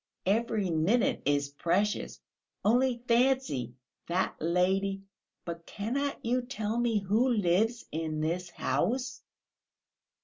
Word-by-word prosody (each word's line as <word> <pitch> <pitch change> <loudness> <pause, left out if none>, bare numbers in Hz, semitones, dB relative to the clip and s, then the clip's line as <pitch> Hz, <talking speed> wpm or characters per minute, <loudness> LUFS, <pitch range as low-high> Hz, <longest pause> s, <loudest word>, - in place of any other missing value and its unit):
Every 210 -1 +1
minute 170 +10 +2
is 145 0 +1
precious.... 180 +8 0 0.5
Only 240 +2 +3
fancy, 235 - +2 0.3
that 180 +2 0
lady... 190 +4 +1 0.4
but 170 -1 -6
cannot 265 +8 -3
you 250 +2 +2
tell 235 -3 -3
me 235 -2 +2
who 210 +6 +2
lives 220 +2 +2
in 160 -1 -2
this 175 +3 -1
house?" 250 +8 -1
205 Hz, 105 wpm, -30 LUFS, 170-240 Hz, 0.5 s, Only